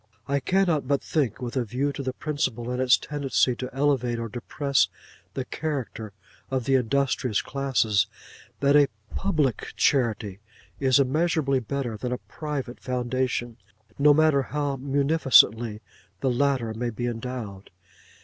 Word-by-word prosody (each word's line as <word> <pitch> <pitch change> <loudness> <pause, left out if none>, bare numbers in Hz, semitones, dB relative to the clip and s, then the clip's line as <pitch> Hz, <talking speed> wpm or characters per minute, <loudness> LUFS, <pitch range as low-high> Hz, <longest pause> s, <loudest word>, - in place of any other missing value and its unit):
I 140 0 +1
cannot 170 -1 +1
but 140 0 +1
think, 130 -6 -1
with 120 +1 -4
a 130 - +1
view 130 +6 -1
to 140 - -5
the 130 -1 -2
principle 130 -4 -2
and 125 +1 -1
its 130 -1 +5
tendency 135 -3 0
to 125 - -4
elevate 135 -3 +1
or 115 0 -4
depress 140 +4 0 0.5
the 130 - -3
character 130 -8 -4 0.4
of 130 -2 -1
the 135 - +1
industrious 130 -2 +1
classes, 115 -7 +1 0.5
that 140 +1 +4
a 145 -1 +6 0.2
Public 155 - -1
Charity 110 -7 +1 0.4
is 135 0 +4
immeasurably 140 0 +2
better 125 -2 -3
than 125 +3 -4
a 125 - -1
Private 140 -3 -6
Foundation, 125 -1 -2 0.4
no 145 +1 +6
matter 155 -1 +4
how 145 0 -2
munificently 135 -6 +3 0.4
the 130 - +1
latter 125 -3 +1
may 120 +2 -2
be 120 +2 -4
endowed. 115 -5 -5
130 Hz, 140 wpm, -26 LUFS, 120-140 Hz, 0.5 s, a